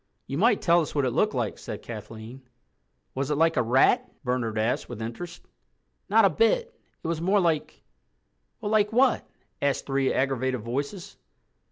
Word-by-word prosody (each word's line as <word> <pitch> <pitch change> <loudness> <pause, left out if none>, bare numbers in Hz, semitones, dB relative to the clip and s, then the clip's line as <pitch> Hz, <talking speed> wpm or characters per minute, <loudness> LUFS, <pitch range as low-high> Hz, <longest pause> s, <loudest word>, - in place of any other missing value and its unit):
"You 135 - -5
might 220 +1 +3
tell 170 -1 +5
us 155 - -5
what 140 -2 +2
it 125 - 0
looked - - +1
like," - - -2
said - - -7
Kathleen. 115 +2 -9 0.7
"Was 135 +1 -2
it 150 - +1
like 165 +1 +3
a 125 - +3
rat?" 135 - +3
Bernard 125 -4 -1
asked 110 +3 0
with 120 -3 -7
interest. 120 +10 -7 0.7
"Not - - +5
a - - +6
bit. 475 +1 +2 0.3
It - - -4
was 165 -1 -2
more 195 +4 +3
like—" 165 -5 -1 0.8
"Well, 210 -2 -3
like 210 -1 +3
what?" 250 +2 +2 0.3
asked 140 -1 0
three 135 -1 +1
aggravated 130 -2 0
voices. 145 - -5
140 Hz, 170 wpm, -26 LUFS, 125-190 Hz, 0.8 s, a